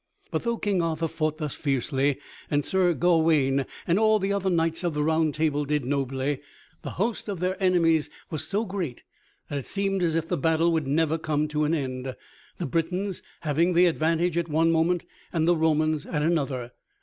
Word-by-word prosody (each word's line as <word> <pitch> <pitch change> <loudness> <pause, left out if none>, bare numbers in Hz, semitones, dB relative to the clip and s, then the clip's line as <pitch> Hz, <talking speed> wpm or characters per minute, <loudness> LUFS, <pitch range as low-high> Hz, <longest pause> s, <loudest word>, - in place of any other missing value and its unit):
But - - -1
though 235 -1 -1
King 200 -5 0
Arthur 165 0 -1
fought 155 -1 -2
thus 150 -4 -3
fiercely, 135 0 0 0.3
and 145 -1 +1
Sir 180 -3 +2
Gawaine 160 -6 +3 0.2
and 175 +3 +2
all 220 0 +4
the 200 0 -1
other 195 -1 0
knights 165 0 0
of 170 -3 -1
the 150 - +1
Round 160 0 +2
Table 150 -2 +1
did 145 -2 -1
nobly, 135 +1 -1 0.4
the - - -5
host 215 +3 -1
of 195 -4 -3
their 185 +1 0
enemies 165 -4 +3 0.2
was 155 - -2
so 205 +3 0
great 185 - -4 0.4
that 145 - -3
it 135 - -8
seemed 195 -1 -1
as 165 -2 +1
if 165 0 0
the 175 - -1
battle 160 +3 +2
would 160 -4 0
never 160 +3 +1
come 155 -1 0
to 150 0 0
an 160 +3 +1
end, 130 -3 -4 0.4
the - - -3
Britons 180 +6 -1 0.2
having 165 +3 +1
the 175 +1 +5
advantage 165 +1 +1
at 170 -1 -3
one 165 +2 +3
moment 165 +2 +1 0.3
and 165 -1 +1
the 175 - +5
Romans 155 -1 +1
at 150 -1 -1
another. 140 -7 0
160 Hz, 195 wpm, -26 LUFS, 150-175 Hz, 0.4 s, the